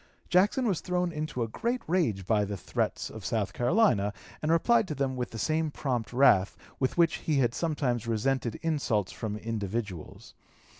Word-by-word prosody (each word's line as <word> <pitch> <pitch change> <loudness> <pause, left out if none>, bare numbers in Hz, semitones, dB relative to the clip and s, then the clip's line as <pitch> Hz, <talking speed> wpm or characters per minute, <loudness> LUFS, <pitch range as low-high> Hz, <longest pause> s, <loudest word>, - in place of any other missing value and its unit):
Jackson 205 +8 +3
was 190 -6 0
thrown 180 -1 -1
into 150 -5 -3
a - - -2
great 235 - -2
rage 130 - 0
by 105 0 +2
the 100 0 -4
threats - - -2
of 110 - -9
South 105 0 -1
Carolina, 120 - +2 0.3
and 155 - 0
replied 225 +6 +3
to 150 - -4
them 135 -1 -1
with 125 -1 -3
the 115 - -8
same 155 +7 0
prompt 125 -7 -2
wrath 120 -7 +4 0.2
with 130 +4 0
which 170 -2 +4
he 155 -3 -1
had 120 -3 +2
sometimes 130 -8 -1
resented 115 +1 0
insults 140 - 0
from 105 -2 -4
individuals. 105 -4 -5
130 Hz, 170 wpm, -29 LUFS, 110-165 Hz, 0.3 s, wrath